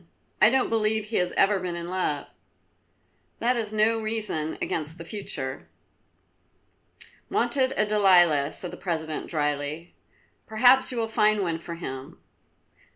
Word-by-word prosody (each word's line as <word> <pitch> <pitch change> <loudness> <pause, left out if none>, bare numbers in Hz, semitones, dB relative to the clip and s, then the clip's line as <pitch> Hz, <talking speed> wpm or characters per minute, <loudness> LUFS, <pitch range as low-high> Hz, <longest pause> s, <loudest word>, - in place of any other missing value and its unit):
I 210 - +8
don't 260 +1 +1
believe 220 -1 +1
he 220 +1 -3
has 180 0 +1
ever 195 0 +3
been 180 -2 -4
in 170 0 -5
love." 180 -6 -2 1.1
"That 245 +2 +1
is 220 -3 -3
no 220 +1 +2
reason 215 -8 -3
against 155 +1 -3
the 165 - -9
future." 155 -9 -5 1.6
"Wanted 260 -2 +2
a 210 - +3
Delilah," 175 -8 +4
said 180 - -6
the - - -9
President 160 -3 -3
dryly. 150 +1 -2 0.5
"Perhaps 250 +4 +4
you 250 - -5
will 225 -1 0
find 215 -2 +2
one 165 -2 -2
for 170 +1 -7
him." 135 -5 -7
190 Hz, 140 wpm, -26 LUFS, 160-220 Hz, 1.6 s, I